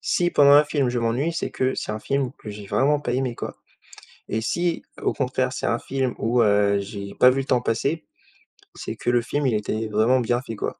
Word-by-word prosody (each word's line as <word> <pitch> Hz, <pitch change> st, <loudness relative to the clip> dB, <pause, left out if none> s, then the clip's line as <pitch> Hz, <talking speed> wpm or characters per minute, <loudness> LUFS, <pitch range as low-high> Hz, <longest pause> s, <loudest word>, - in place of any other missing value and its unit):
Si 175 Hz, -1 st, +1 dB
pendant 140 Hz, -3 st, +6 dB
un 145 Hz, +1 st, +7 dB
film 145 Hz, -3 st, 0 dB
je 120 Hz, 0 st, -1 dB
m'ennuie, 120 Hz, +8 st, 0 dB
c'est 165 Hz, -, -3 dB
que 130 Hz, 0 st, -1 dB
c'est -, -, -4 dB
un 105 Hz, -, -4 dB
film 135 Hz, +3 st, -1 dB
que -, -, -10 dB
j'ai 105 Hz, -1 st, -8 dB
vraiment 145 Hz, +8 st, +2 dB
pas 125 Hz, -4 st, -3 dB
aimé 130 Hz, -1 st, -1 dB
quoi -, -, -6 dB, 0.7 s
et 110 Hz, -, -1 dB
si, 170 Hz, +8 st, -1 dB, 0.2 s
au -, -, 0 dB
contraire, 130 Hz, -1 st, -1 dB
c'est -, -, -3 dB
un 115 Hz, 0 st, +1 dB
film 130 Hz, -1 st, -2 dB
où, 120 Hz, +2 st, +1 dB
heu, 100 Hz, -2 st, +3 dB
j'ai 100 Hz, 0 st, -7 dB
pas 125 Hz, -, +6 dB
vu 130 Hz, -, 0 dB
le 135 Hz, -, -3 dB
temps 125 Hz, -2 st, +2 dB
passer, 140 Hz, +8 st, -1 dB, 0.7 s
c'est -, -, -6 dB
que -, -, -3 dB
le 120 Hz, 0 st, +3 dB
film, 145 Hz, +5 st, -2 dB
il 125 Hz, -, +1 dB
était 110 Hz, +1 st, -2 dB
vraiment 110 Hz, +5 st, +2 dB
bien 120 Hz, +1 st, 0 dB
fait, 115 Hz, -3 st, -7 dB
quoi -, -, -5 dB
125 Hz, 235 wpm, -23 LUFS, 110-135 Hz, 0.7 s, un